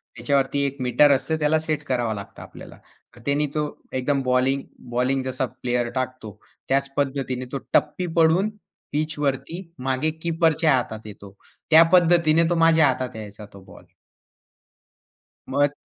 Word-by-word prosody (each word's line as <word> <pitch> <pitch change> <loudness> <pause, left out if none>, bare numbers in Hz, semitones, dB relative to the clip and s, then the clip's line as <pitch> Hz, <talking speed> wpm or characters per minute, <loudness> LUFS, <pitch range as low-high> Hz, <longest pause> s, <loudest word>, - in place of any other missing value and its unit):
त्याच्यावरती 135 +3 0
एक 140 0 -3
मीटर 130 +4 +4
असत 135 +1 0
त्याला 150 +1 +2
सेट 155 -1 -3
करावा 120 -3 0
लागत 100 -1 -9
आपल्याला. - - -12 0.5
त्याने 145 +1 +1
तो 150 - +1 0.3
एकदम 135 +2 0
बॉलिंग, 130 +2 +1 0.3
बॉलिंग 125 +2 0
जसा 130 0 -2 0.2
प्लेयर 120 -1 -1
टाकतो 130 -4 -4 0.4
त्याच 140 +1 +1
पद्धतीने 135 -2 -2
तो 140 - -2 0.2
टप्पी 150 +4 +1
पडून 165 +5 +4 0.4
पिच 155 +1 -2
वरती 140 +4 -2 0.3
मागे 130 +4 +1
कीपरच्या 160 -2 +2
हातात 110 -3 -4
येतो. 100 -1 -12 0.4
त्या 160 +1 +9
पद्धतीने 170 -2 +5
तो 175 - +1
माझ्या 160 -2 +5
हातात 130 -3 -2
यायचा 105 -1 -9
तो 100 - -13
बॉल. - - -15 1.7
मग 145 0 +2
140 Hz, 140 wpm, -23 LUFS, 125-155 Hz, 1.7 s, त्या